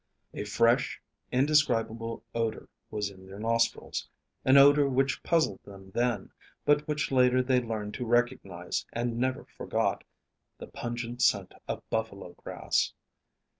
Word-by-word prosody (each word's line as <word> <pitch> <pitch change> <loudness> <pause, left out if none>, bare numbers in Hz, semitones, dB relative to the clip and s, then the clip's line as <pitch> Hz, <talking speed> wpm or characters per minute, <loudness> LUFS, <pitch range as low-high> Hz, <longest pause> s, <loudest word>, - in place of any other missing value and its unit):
A 105 - -4
fresh, 115 +3 +2 0.3
indescribable 115 -5 +1
odor 115 -1 -2 0.2
was 105 -1 -2
in 95 -1 -15
their 95 +1 -10
nostrils; 115 +2 0 0.3
an 130 +1 +6
odor 140 0 +7
which 135 0 +1
puzzled 160 - +1
them 95 -1 -13
then, 120 +1 -1 0.3
but 150 +1 +3
which 150 -1 -1
later 130 -1 +4
they 125 -1 +3
learned 110 -3 -4
to 125 - -4
recognize 120 -7 0
and 120 0 -2
never 130 +1 -1
forgot - - -2 0.5
the - - -8
pungent 120 0 -5
scent 100 -6 +2
of - - -5
buffalo 100 -5 -3
grass. - - -1
120 Hz, 130 wpm, -29 LUFS, 110-130 Hz, 0.5 s, odor